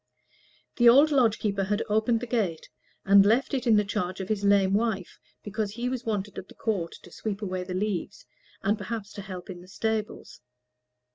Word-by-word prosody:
The 240 -1 +7
old 285 +6 +6
lodge 240 -6 +3
keeper 200 -2 -1
had 205 +3 0
opened 220 +2 +1
the - - -3
gate 210 -9 -2 0.4
and 195 0 +7
left 235 +8 +2
it 260 -2 -1
in 225 - +6
the 210 0 +3
charge 190 -3 -3
of 190 - -5
his 210 -2 -1
lame 200 -1 +4
wife, 205 -4 -1 0.2
because 210 0 -3
he 240 +2 -2
was 255 -1 -4
wanted 205 -2 -2
at 190 - -11
the - - -16
Court 195 -7 -2
to 175 - -14
sweep 210 +2 -5
away 185 -2 -3
the 180 0 -5
leaves, 200 0 -3 0.4
and 205 +2 +1
perhaps 205 0 -5
to 200 - -7
help 185 -2 -8
in 180 -2 -8
the 180 - -15
stables. 220 +2 -4
210 Hz, 200 wpm, -27 LUFS, 195-225 Hz, 0.4 s, The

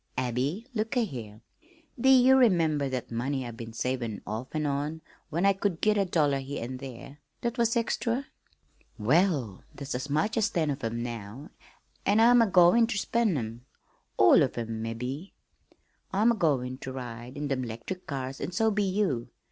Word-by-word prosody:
"Abby, 130 - -1
look 225 +3 -1
a' 240 - +3
here! 110 - -8 0.6
Do 265 - +4
ye 260 -1 +7
remember 165 - +4
that 130 -2 -4
money 130 +3 -2
I've 120 -1 -7
been 115 0 -8
savin' 120 -2 -3
off 110 +4 -4
an' 155 -1 0
on 145 +3 -2 0.3
when 170 +5 0
I 200 - +5
could 195 -3 -2
git 215 0 +3
a 200 -1 +2
dollar 150 -6 +1
here 135 -2 -5
an' 130 +2 -5
there 135 +2 -10 0.2
that 235 +1 -2
was 235 0 +2
extra? 235 +3 -1 0.7
Well, 135 - +1
there's 140 0 -5
as 130 +4 -4
much 155 +10 0
as 220 -1 +2
ten 160 -4 0
of 140 -1 -5
'em 115 +1 -2
now, 120 +4 -7 0.5
an' 205 +2 +3
I'm 240 +1 +7
agoin' 195 +2 +5
ter 240 - -3
spend 215 -3 +1
'em 115 0 -5 0.5
all - - +7
of - - 0
'em 115 -1 -3
mebbe. 125 - -5 0.8
I'm 215 +5 +4
agoin' 135 - 0
ter 130 - -6
ride 125 0 -7
in 145 0 -2
them 135 -2 0
'lectric 120 +11 -6
cars, 135 -2 -4
an' - - -3
so 220 +4 +2
be 210 0 0
you. 185 - 0
145 Hz, 180 wpm, -28 LUFS, 125-200 Hz, 0.8 s, ye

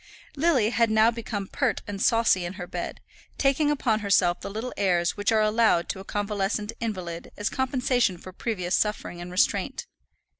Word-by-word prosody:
Lily 275 -8 +2
had 230 -2 +2
now 220 +1 +4
become 225 -3 -4
pert 255 +4 -1
and 200 -1 -5
saucy 225 -5 +3
in 175 +1 -4
her 180 - -6
bed, - - -5 0.4
taking 280 +2 +2
upon 250 -7 +1
herself 185 -4 +2
the - - -5
little 220 +5 -5
airs 175 -3 +1
which 205 +1 0
are 220 -1 +3
allowed 215 -5 +3
to 195 - -3
a - - -8
convalescent 205 +1 -2
invalid 185 -7 -5
as 210 - -1
compensation 250 -6 +1
for 185 +2 -11
previous 185 -4 -3
suffering 210 -5 -1
and 175 - -7
restraint. 185 +1 0
210 Hz, 175 wpm, -26 LUFS, 185-230 Hz, 0.4 s, now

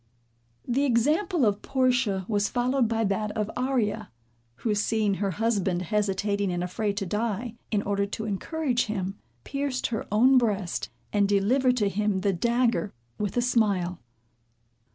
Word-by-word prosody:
The 260 +4 +1
example 295 - +2
of 205 -1 +1
Portia 250 -7 +1
was 205 -2 +1
followed 250 0 +1
by 225 0 0
that 210 +1 0
of 210 0 -1
Arria, 235 -5 0 0.5
who 215 - -1
seeing 210 0 +1
her 200 - +1
husband 195 -3 0
hesitating 200 0 0
and 175 0 -2
afraid 200 +3 -2
to 200 - -1
die, 220 +3 -2 0.2
in 210 -2 0
order 200 0 0
to 220 +2 -5
encourage 250 - -1
him, 195 -2 -3 0.2
pierced 275 -2 -2
her 220 - -3
own 255 +5 +6
breast, 205 -7 -1 0.2
and 200 -1 +3
delivered 250 +6 +3
to 210 -4 +2
him 200 -1 0
the 195 0 +1
dagger 235 +2 +1 0.3
with 205 +1 -2
a 240 - +3
smile. 200 -8 +1
215 Hz, 150 wpm, -27 LUFS, 200-245 Hz, 0.5 s, own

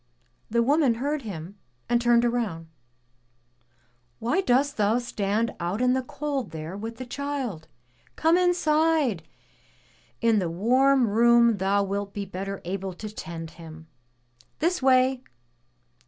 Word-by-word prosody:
*' 120 - -43
The 235 +1 +2
woman 280 -2 +3
heard 285 +5 -2
him 195 -3 -8 0.3
and 240 0 +2
turned 240 0 +4
round. 220 -10 -2 1.5
"Why 245 +12 0
dost 280 -2 +1
thou 210 +2 +2
stand 220 -2 -1
out 175 +5 -2
in 250 0 +3
the 260 - +1
cold 275 -2 -4
there 160 +3 -7
with 225 +3 -6
the 255 - -6
child? 255 - -4 0.5
Come 325 +2 +3
inside! 320 - +2 1.0
In 230 -2 +3
the 180 -3 -1
warm 250 +8 +3
room 235 +1 +4
thou 200 +1 +1
wilt 200 0 -4
be 200 -1 -3
better 195 +1 -6
able 190 +1 -4
to 210 +4 -8
tend 165 -4 -7
him. 160 -1 -12 0.7
This 350 +1 0
way!'' 260 0 +3
230 Hz, 135 wpm, -26 LUFS, 195-260 Hz, 1.5 s, turned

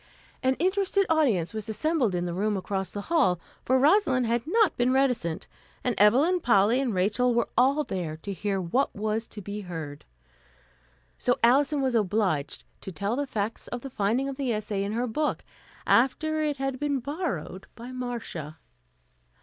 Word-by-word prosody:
An 260 0 +2
interested 390 +3 +1
audience 240 - +2
was 215 0 -5
assembled 255 - 0
in 175 0 -1
the 175 - -3
room 205 +3 0
across 190 -1 -3
the 205 - -4
hall, 205 - +2 0.2
for 260 - +3
Rosalind 270 - +3
had 235 +1 +1
not 440 +4 +3
been 245 +1 +2
reticent, 250 -11 0 0.4
and 250 - +1
Evelyn, 270 - +5
Polly 230 - +3
and 260 -3 0
Rachel 215 +7 +2
were 235 - +1
all 275 +4 +3
there 170 - -4
to 200 +5 -6
hear 195 0 -2
what 190 +10 0
was 215 +2 -2
to 210 - -9
be 205 +2 -5
heard. 160 -6 -7 1.2
So 245 - +1
Alison 280 +4 +4
was 260 -2 +1
obliged 190 -9 0 0.2
to 190 - -7
tell 200 +5 -2
the 285 +1 -2
facts 215 -1 -3
of 245 - -5
the 270 - -8
finding 230 +5 0
of 275 -1 -5
the 270 -3 -1
essay 210 -2 -2
in 200 +1 -3
her 240 +2 0
book 295 +6 -2 0.4
after 310 +6 +2
it 300 -2 -1
had 270 -1 -2
been 290 -1 0
borrowed 255 - -4
by 240 +2 -9
Marcia. 235 - -5
235 Hz, 175 wpm, -27 LUFS, 200-275 Hz, 1.2 s, Evelyn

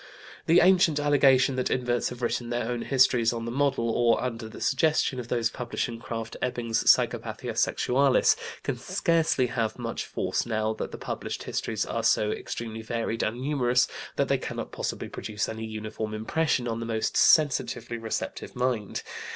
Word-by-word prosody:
The 170 +2 +6
ancient 175 -4 +4
allegation 135 -3 +4
that 130 - 0
inverts 120 -1 0
have 125 0 -8
written 120 0 -1
their 120 -1 -1
own 120 -1 -2
histories 125 -4 +3
on 115 -1 -4
the 115 - -3
model, 135 -2 +1
or 120 0 +3
under 115 -3 -4
the - - -10
suggestion, 140 -2 +1
of 120 - -6
those 120 -1 0
published 125 -1 -3
in 115 -1 -7
Krafft 115 -1 -5
Ebing's 115 -2 -1
Psychopathia - - +2
Sexualis 135 +1 +3 0.3
can - - -3
scarcely 165 -6 +1
have 115 -3 -2
much 115 -2 -4
force - - -1
now 110 -1 -1
that 110 - -5
the - - -7
published - - -5
histories 110 -2 -2
are 115 - -2
so 110 -2 +2
extremely 115 -1 -5
varied 115 0 -2
and 115 +3 -1
numerous 125 -3 +2 0.3
that - - +1
they - - +1
cannot - - -5
possibly - - -4
produce 105 -2 -4
any 110 0 -5
uniform 110 0 -5
impression 125 +3 0
on 115 -1 -2
the 115 - -4
most 110 -1 -1
sensitively 130 -5 +3
receptive 110 -1 -4
mind. 125 -5 -1
120 Hz, 170 wpm, -27 LUFS, 115-130 Hz, 0.3 s, The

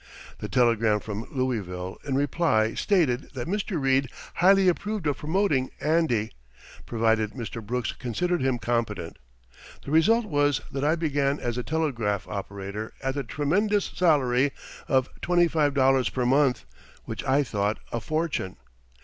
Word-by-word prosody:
The - - -5
telegram 115 -4 +3
from 105 +1 -6
Louisville 95 -9 -3
in 140 -2 -2
reply 135 -6 +1
stated 165 -12 +1
that 125 +1 -4
Mr. 200 -2 -2
Reid 135 -1 +2 0.2
highly 195 +1 +5
approved 205 +1 0
of 145 -2 0
promoting 155 -5 +1
"Andy," 150 -8 +1 0.6
provided 110 -2 +1
Mr. 115 -2 -6
Brooks 120 +2 -2
considered 175 +8 -2
him 130 -1 +1
competent. 115 -7 -2 0.7
The 140 - -5
result 220 +9 +4
was 145 -6 +1
that 135 0 -3
I 155 +3 +3
began 145 -3 0
as 120 -1 -2
a 125 - -2
telegraph 120 - -1
operator 100 +2 -6
at 135 0 0
the 140 0 -3
tremendous 195 - 0
salary 140 -6 +2 0.3
of 130 -1 +2
twenty 175 -1 +3
five 150 -3 +1
dollars 135 -1 +3
per 125 -2 -2
month, 135 0 +2 0.4
which - - -5
I 135 +2 +3
thought 105 -4 -1
a 120 - -1
fortune. 155 - -2
135 Hz, 145 wpm, -26 LUFS, 115-160 Hz, 0.7 s, highly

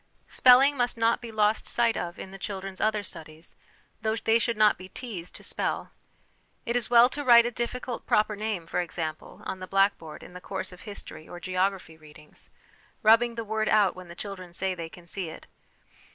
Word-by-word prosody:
Spelling 260 +3 +6
must 245 -1 0
not 230 0 +2
be 235 -2 -7
lost 215 0 +2
sight 235 -1 +2
of 175 0 -4
in 190 - -8
the 195 - -10
children's 190 -1 -5
other 215 -1 +1
studies, 160 -2 -9 0.5
though 220 0 0
they 225 0 +2
should 230 -1 -1
not 215 0 +5
be 185 +1 -11
teased 200 -9 -7
to - - -8
spell. - - -2 0.7
It 235 - -1
is 245 -1 -1
well 240 0 +7
to 290 +2 -5
write 235 -3 +7
a 240 - -1
difficult 240 +1 -4
proper 210 0 +2
name, 210 -5 -3
for 170 - -1
example, 160 -2 -6
on 190 - -4
the 185 - -7
blackboard 195 -6 0
in - - -12
the 180 - -9
course 190 0 -4
of 180 - -13
history 180 -5 -9
or 175 - -8
geography 185 -2 -1
readings, 155 -1 -12 0.5
rubbing 230 +2 +5
the 230 -1 -4
word 220 0 -1
out 205 -3 +4
when 185 -1 -10
the 170 - -10
children 185 -3 -8
say 190 +2 -1
they 165 -2 -6
can 175 0 -14
see 175 0 -5
it. 160 - -11
200 Hz, 200 wpm, -27 LUFS, 180-230 Hz, 0.7 s, well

